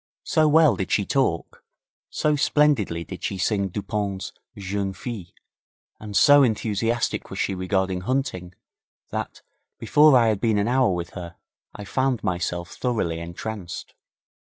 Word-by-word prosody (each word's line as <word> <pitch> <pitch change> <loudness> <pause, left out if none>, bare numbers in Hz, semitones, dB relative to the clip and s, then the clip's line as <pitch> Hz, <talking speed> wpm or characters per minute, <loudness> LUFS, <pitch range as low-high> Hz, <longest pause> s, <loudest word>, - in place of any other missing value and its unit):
So 155 -3 +2
well 155 0 +5
did 95 - -4
she 100 - +2
talk, 110 -12 -1 0.5
so 150 -1 +1
splendidly 140 - +2
did - - -9
she 95 - -2
sing 100 +1 0
Dupont's 100 0 -4 0.2
'Jeune 100 0 -3
Fille', 100 -2 -6 0.7
and 105 -2 -3
so 145 0 +7
enthusiastic 115 -1 0
was - - -7
she - - 0
regarding 95 0 -1
hunting, 95 -7 -2 0.6
that, - - -5 0.3
before 150 -2 +5
I 115 -2 +4
had 105 -2 -1
been 110 -3 +2
an 100 +1 +1
hour 125 -4 +3
with 85 -1 -3
her, 85 -2 -8 0.4
I 105 - -8
found 130 +3 0
myself 85 -2 -2
thoroughly 105 -10 -2
entranced. 85 +2 -7
100 Hz, 140 wpm, -24 LUFS, 95-125 Hz, 0.7 s, so